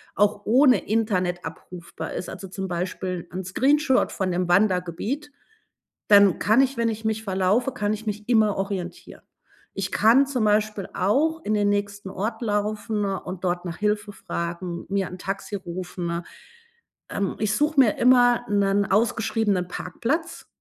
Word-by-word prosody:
auch 205 0 +2
ohne 255 +3 +4
Internet 185 -5 0
abrufbar 170 +2 -8
ist, - - -5
also, 195 - -8
zum 190 +1 -5
Beispiel 180 0 -4
'n 190 +1 -4
Screenshot 265 - +2
von 185 -2 -2
dem 180 0 -1
Wandergebiet, 195 - 0 0.8
dann 200 -3 +6
kann 220 +7 +4
ich, 270 -1 0
wenn 230 0 +1
ich 220 0 -5
mich 220 0 -1
verlaufe 200 +6 +1
kann 210 0 -1
ich 220 +1 -6
mich 210 +1 -5
immer 220 -4 +3
orientieren. 195 -2 -5 0.5
Ich 195 -1 -3
kann 245 +6 +5
zum 250 -6 0
Beispiel 210 -2 +1
auch 300 - +1
in 215 - 0
den 205 -1 +2
nächsten 200 -1 -2
Ort 220 +5 -4
laufen 210 -1 -1
und 190 -1 -4
dort 175 0 -1
nach 165 -2 -5
Hilfe 210 0 -1
fragen, 170 -1 -5
mir 195 -1 0
'n 180 - -8
Taxi 195 +2 -4
rufen. 175 -2 -5 0.9
Ähm, 200 -2 -2
ich 215 0 0
suche 295 -1 +1
mir 235 -6 +4
immer 245 -1 +4
'nen 200 0 +2
ausgeschriebenen 215 -3 +1
Parkplatz, 310 - -3
205 Hz, 150 wpm, -24 LUFS, 185-225 Hz, 0.9 s, dann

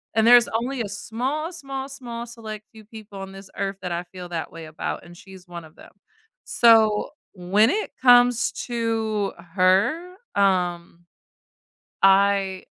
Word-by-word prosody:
And 220 - +3
there's 240 0 +7
only 240 +3 -2
a 205 - -4
small, 260 - -4
small, 270 -4 -6
small, 240 -4 -7
select 220 -3 -9
few 220 -1 -15
people 215 -2 -11
on 195 0 -8
this 195 0 -11
earth 195 0 -2
that 180 - -4
I 170 +1 -2
feel 180 -1 -8
that 165 -2 -5
way 165 0 -9
about 155 0 -5
and 175 0 -14
she's 190 -1 -14
one 170 -2 -9
of 155 - -18
them. - - -16 0.5
So, 225 -2 +4 0.2
when 200 +4 +2
it 425 +8 -2
comes 245 -1 +5 0.2
to 225 -3 -2 0.2
her, 205 - +2 0.2
um, 175 -3 0 1.0
I 195 -1 +3
210 Hz, 150 wpm, -23 LUFS, 185-240 Hz, 1.0 s, there's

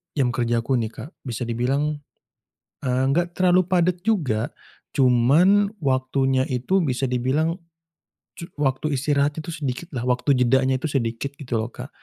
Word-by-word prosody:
jam 130 -4 +2
kerja 120 -1 0
aku 130 +1 +1
nih 110 -1 -2
Kak, 120 +7 -8 0.2
bisa 120 0 -3
dibilang, 135 +6 -1 0.8
eee, 130 -1 +1
gak 175 0 +1
terlalu 185 0 +4
padat 180 -1 +1
juga 150 - 0 0.4
cuman 145 +11 +4
waktunya 130 -1 +1
itu 130 +10 +1
bisa 135 -2 -1
dibilang 130 +7 0 0.8
cu 170 - -6 0.2
waktu 140 +2 0
istirahat 145 +2 +1
itu 170 - -9
sedikit 150 +1 -4
lah, 120 0 -3
waktu 125 +3 +2
jedanya 130 +1 +3
itu - - -5
sedikit 130 0 -2
gitu 125 -4 -2
loh 110 - -3
Kak. 130 +3 -8
135 Hz, 150 wpm, -23 LUFS, 125-155 Hz, 0.8 s, terlalu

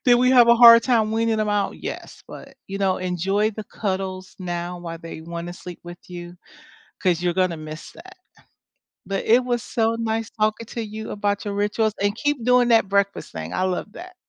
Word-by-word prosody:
Did 245 -1 +6
we 250 +1 +3
have 245 -2 +7
a 235 - +8
hard 230 -1 +9
time 225 -4 +2
weaning 225 0 +1
them 215 -1 0
off? 205 -1 0
Yes, - - -8
but, - - -11
you 195 +1 -4
know, 190 -2 +1
enjoy 190 +4 0
the 215 0 -8
cuddles 190 -2 -4
now 175 -1 -4
while 165 -1 -7
they 165 -1 -9
wanna 170 +1 -6
sleep 180 -1 -10
with 175 0 -9
you, 175 0 -8 0.7
'cause 180 -3 +1
you're 175 -1 +1
gonna 185 -3 +1
miss 155 +1 -9
that. 375 +3 -14 0.9
But 195 0 -2
it 240 +3 +4
was 240 -2 -1
so 225 0 0
nice 225 -1 -2
talking 215 +1 -1
to 230 +1 -5
you 215 +1 -7
about 205 0 -2
your 205 -1 -3
rituals, 210 +1 0
and 205 +1 +1
keep 290 -2 -1
doing 250 0 +4
that 225 -4 +4
breakfast 200 0 0
thing, 80 0 -6
I 185 - 0
love 185 +3 -2
that. 365 +5 -11
205 Hz, 200 wpm, -23 LUFS, 180-230 Hz, 0.9 s, hard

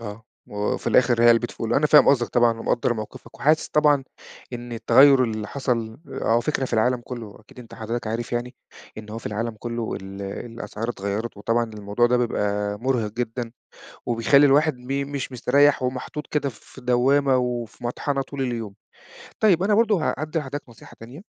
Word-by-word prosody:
آه. 110 0 -8 0.2
وفي 105 0 -3
الآخر 120 -2 +3
هي 120 - +7
علبة 120 +1 +4
فول. 115 - -3
أنا 150 - +3
فاهم 150 0 +6
قصدك 125 -4 +3
طبعًا 120 -2 +2
ومقدّر 120 +1 0
موقفك، 110 -2 -9
وحاسس 155 +2 +2
طبعًا 145 -2 +3 0.5
إن 120 0 -7
التغيُّر 130 +3 +5
اللي 110 -2 -3
حصل 120 -4 -2
أو 115 +1 +1
فكرة 135 +1 -1
في 130 - -7
العالم 120 +2 +2
كله 115 -5 -8
أكيد 110 - -19
أنت 120 -2 -11
حضرتك 115 +2 -4
عارف 115 +2 -4
يعني، 120 +1 -3 0.4
إن 105 -1 -10
هو 110 - -5
في - - -9
العالم 110 +2 -3
كله 115 0 -4
ال 95 +1 -8
الأسعار 115 +2 -6
اتغيّرت 105 +1 -4
وطبعًا 115 +3 0
الموضوع 105 +1 0
ده 125 +1 +2
بيبقى 105 -3 -1
مُرهق 120 -3 -1
جدًا 120 0 -4 0.5
وبيخلّي 120 +5 +4
الواحد 145 0 +3
م 135 +3 -4
مش 140 -1 -4
مستريح 135 +3 +3
ومحطوط 130 +4 -4
كده 145 -2 -1
في 130 +2 -15
دوّامة 130 +2 +3
وفي 120 -2 -3
مطحنة 135 +3 -2
طول 135 +1 -6
اليوم. 115 -6 -3 0.6
طيب 190 -5 +4
أنا 210 +2 +2
برضه 210 -5 +2
ه - - +1
هادّي 155 +3 -2
لحضرتك 145 -2 -7
نصيحة 115 - -15
تانية، 125 +8 -11
120 Hz, 175 wpm, -23 LUFS, 115-135 Hz, 0.6 s, هي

